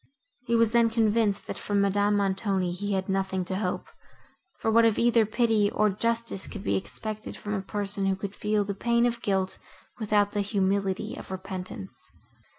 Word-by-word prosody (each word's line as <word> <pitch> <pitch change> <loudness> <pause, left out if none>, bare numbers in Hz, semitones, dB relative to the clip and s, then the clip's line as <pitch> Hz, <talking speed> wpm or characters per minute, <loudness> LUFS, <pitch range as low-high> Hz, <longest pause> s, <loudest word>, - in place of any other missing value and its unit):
He 235 - +2
was 230 -1 +4
then 235 -1 +4
convinced, 220 -2 +2
that - - -5
from 205 -1 0
Madame 205 +1 +2
Montoni 195 -2 0
he 200 +3 -3
had 190 -1 -1
nothing 190 -1 -1
to 185 +1 -2
hope, 210 - -2 0.7
for 220 - 0
what 230 +1 +6
of 225 -2 +3
either 235 -2 +4
pity, 220 -2 +2
or 210 0 +2
justice 230 0 -1
could - - -7
be 100 0 +1
expected 215 - -3
from 210 - -5
a 195 - -1
person, 200 0 -2
who 190 - +2
could 195 +1 -6
feel 210 0 0
the 200 0 -3
pain 235 +4 +2
of 235 -1 -1
guilt, 190 -3 0 0.4
without 205 -2 +2
the 205 - 0
humility 200 0 0
of - - -9
repentance? 185 - -7
205 Hz, 180 wpm, -27 LUFS, 195-220 Hz, 0.7 s, what